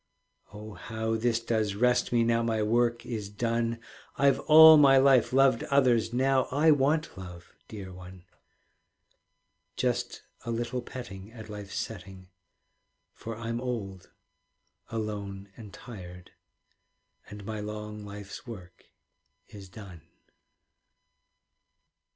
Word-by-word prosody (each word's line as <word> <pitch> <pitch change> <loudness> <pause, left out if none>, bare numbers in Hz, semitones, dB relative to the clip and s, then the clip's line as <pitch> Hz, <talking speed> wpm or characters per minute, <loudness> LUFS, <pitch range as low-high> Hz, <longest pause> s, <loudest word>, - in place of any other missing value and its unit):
Oh, 105 +1 -10
how 110 +1 -3
this 115 +1 0
does 110 -3 -1
rest 125 +4 +2
me 120 -1 +3
Now 115 0 +2
my 110 -2 0
work 120 +2 +1
is 110 -5 -5
done! 115 +2 -2 0.4
I've 140 0 +3
all 160 +1 +9
my 140 -2 +6
life 135 -2 +4
loved 130 -2 +4
others, 125 -5 +2
Now 130 +1 +2
I 150 +4 +3
want 150 +3 +1
love, 90 -2 -11
dear 95 -4 -9
one. 90 0 -12 1.5
Just - - -2 0.2
a - - -7
little 120 +2 -2
petting 105 -5 -9
At 110 -2 -11
life's 105 -2 -7
setting; 95 -3 -7 0.8
For 115 -1 -8
I'm 115 +1 -4
old, 100 -7 -5 0.8
alone, 100 -3 -5
and 110 -4 -11
tired, 90 -6 -11 1.0
And 105 -1 -10
my 110 0 -5
long 105 0 -7
life's 100 +3 -9
work 90 -7 -11 0.6
is 100 -3 -12
done. 90 -4 -11
110 Hz, 115 wpm, -28 LUFS, 100-120 Hz, 1.5 s, all